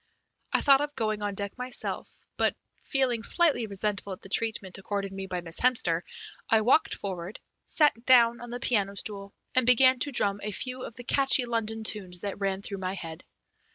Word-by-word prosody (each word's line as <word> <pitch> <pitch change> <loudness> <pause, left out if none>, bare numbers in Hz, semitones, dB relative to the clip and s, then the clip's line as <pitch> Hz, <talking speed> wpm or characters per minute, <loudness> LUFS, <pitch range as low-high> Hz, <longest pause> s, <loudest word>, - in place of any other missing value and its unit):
I - - +2
thought 275 -1 +5
of 290 0 -3
going 215 -1 -1
on 205 -1 -2
deck 200 +4 -5
myself, 250 0 -4 0.3
but, - - +1 0.3
feeling 255 -4 0
slightly 285 -4 +2
resentful 200 0 -2
at 185 - -11
the 195 - -11
treatment 205 -3 -1
accorded 195 0 -3
me 195 0 -6
by 180 -1 -3
Miss 165 0 -5
Hemster, 205 -10 +2 0.5
I 225 -1 +4
walked 250 +8 +3
forward, 185 0 -6 0.3
sat 295 -7 +4
down 235 -2 +5
on 240 - -8
the 245 +1 -5
piano 200 -5 0
stool, 200 -1 -3 0.2
and 255 - +3
began 255 +1 +5
to 285 - -1
drum 200 -5 +2
a 210 - -4
few 255 +5 -3
of 235 - -8
the 245 - -9
catchy 270 0 +3
London 225 -2 -2
tunes 185 -5 -3
that 200 -1 -5
ran 195 -1 -2
through 200 -1 -5
my 185 0 -3
head. 165 -3 -8
215 Hz, 190 wpm, -28 LUFS, 195-250 Hz, 0.5 s, thought